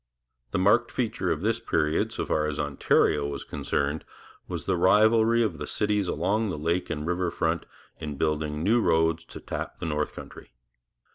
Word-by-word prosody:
The - - -1
marked 105 +6 +4
feature 110 -7 -1
of 80 - -1
this 115 +3 +1
period, 75 -8 0
so - - -3
far 75 0 +1
as 75 -1 -3
Ontario 70 0 +2
was 70 -1 -5
concerned, 70 +1 -2 0.4
was - - -5
the 95 - +1
rivalry 110 +5 +4
of 110 - -2
the - - -5
cities 105 -2 0
along 100 +7 0
the 85 - -3
lake 85 +4 -1
and 75 0 -3
river 90 +1 0
front 85 0 -1 0.3
in 75 -3 -5
building 75 0 -1
new 115 +5 +3
roads 80 -2 +2
to - - -10
tap - - -5
the - - -5
north 75 -1 -1
country. - - -11
85 Hz, 180 wpm, -27 LUFS, 75-105 Hz, 0.4 s, marked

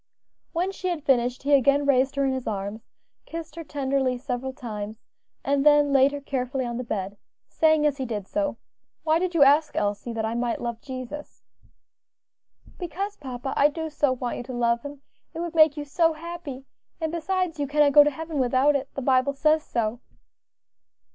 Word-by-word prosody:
When 360 +3 -1
she 370 -1 -5
had 345 -5 -2
finished, 250 -3 +1
he 285 +1 +2
again 280 +1 +4
raised 265 -1 +3
her 280 0 +1
in 265 - +1
his 260 -1 -4
arms, 205 +1 -4 0.4
kissed 330 -2 -7
her 335 - -6
tenderly 270 -3 -1
several 255 +1 -4
times, 215 -4 -6 0.5
and 280 0 +2
then 295 -1 +5
laid 270 0 +5
her 285 - -4
carefully 265 -2 -2
on 235 -1 -4
the 250 - -3
bed, 200 -3 -4 0.3
saying, 315 -1 +3
as 290 -2 +2
he 265 - -3
did 210 -4 -4
so, 295 0 -1 0.5
"Why 315 +1 +3
did 360 -1 -2
you 300 - +7
ask, 295 +2 +4
Elsie, 205 +3 -1
that 225 -1 -2
I 220 - -2
might 240 0 -1
love 235 -1 -4
Jesus?" 260 +2 -8 1.4
"Because, 390 +4 -4
papa, 260 -3 -5
I 285 - +5
do 320 +1 -5
so 290 -2 +2
want 250 -1 -3
you - - -5
to 255 - -7
love 235 -1 +1
Him; 285 0 -9 0.3
it - - -4
would 340 -1 -3
make 310 -2 +5
you 295 - -4
so 325 +3 +2
happy; 315 -5 -7 0.3
and 320 -2 -2
besides, 345 -1 -1
you 285 - -1
cannot 295 0 +4
go 295 - +9
to 295 - +2
heaven 315 +1 -5
without 260 +3 +3
it; 275 0 -2
the 275 - -4
Bible 260 +1 +3
says 310 +2 +3
so." 230 0 -2
280 Hz, 195 wpm, -25 LUFS, 250-310 Hz, 1.4 s, go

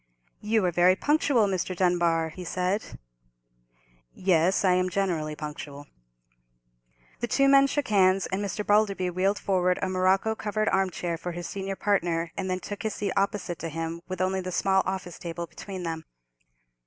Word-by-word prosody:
"You 215 -1 +1
are 180 - +2
very 175 +2 +4
punctual, 285 -2 +2
Mr. 185 -1 -2
Dunbar," 170 -2 +2
he 180 +3 -9
said. 185 +4 -2 1.2
"Yes, 185 +1 +2
I 185 - +5
am 185 0 +1
generally 170 -5 -1
punctual." 150 -1 -7 1.3
The 240 - -2
two 275 +3 +3
men 275 0 +6
shook 285 -2 -2
hands, 190 -2 +4
and 190 +2 -1
Mr. 205 +1 -3
Balderby 200 -3 +2
wheeled 190 +3 +1
forward 180 -2 +1
a 195 - -1
morocco 185 +4 +2
covered 215 0 -1
arm 190 0 +2
chair 170 -2 -4
for 175 0 -5
his 175 0 -5
senior 195 0 -4
partner, 170 -5 0
and 190 -1 -3
then 185 0 -1
took 205 - -6
his 220 -1 -2
seat 200 -2 -2
opposite 195 -3 -1
to 165 - -4
him, 165 +1 -4
with 185 -1 -4
only 190 0 0
the 185 0 -5
small 190 +1 +2
office 190 -2 -4
table 170 0 -5
between 190 +1 -8
them. 165 -1 -4
185 Hz, 170 wpm, -27 LUFS, 175-200 Hz, 1.3 s, men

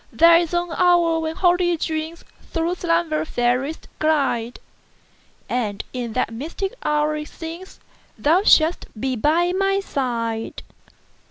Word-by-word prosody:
There 335 0 +6
is 335 -2 0
an 345 -1 -1
hour 345 -2 +3
when 320 0 -3
holy 350 -1 +2
dreamsThrough 330 +2 -4
slumber 335 -3 0
fairest 255 +2 -1
glide; 275 -7 0 0.9
And 215 -5 -2
in 240 -3 -4
that 225 - -1
mystic 330 - -4
hour 300 0 +1
it 300 0 -5
seemsThou 335 0 -3
shouldst 320 +2 +4
be 260 +2 -1
by 320 +9 +2
my 390 +1 +1
side. 235 - -3
320 Hz, 115 wpm, -22 LUFS, 265-345 Hz, 0.9 s, There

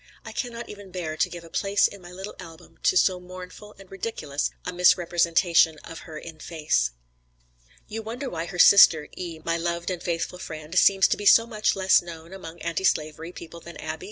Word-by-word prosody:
I - - -7
cannot 235 -2 -5
even 205 -2 -11
bear 175 -4 -4
to - - +1
give 175 -1 -9
a 165 - -13
place 200 +2 +2
in 200 - -12
my 175 0 -12
little 190 +3 -8
album 165 -3 -13
to 375 - +3
so 185 - +3
mournful 185 +3 -11
and 195 -1 -16
ridiculous 165 -8 -3 0.2
a 180 - -4
misrepresentation 170 -2 +3
of 165 -1 -9
her 155 - -7
in 160 0 -10
face." 150 - 0 1.0
"You 225 +1 -5
wonder 235 +5 -6
why 170 -6 -4
her 180 - -7
sister, 165 -5 +7
E., 170 -3 -7
my 165 0 0
loved 170 +1 -2
and 180 - -4
faithful 170 +1 -3
friend, 155 -1 -8
seems 195 +1 +5
to - - +1
be 205 - -2
so 230 - +7
much 215 -2 0
less 190 -1 +4
known 170 0 -10
among 170 -3 -10
anti 170 +2 -2
slavery 155 -1 0
people 170 -1 -10
than 170 +1 -11
Abbie? 155 0 -5
175 Hz, 200 wpm, -25 LUFS, 165-195 Hz, 1.0 s, sister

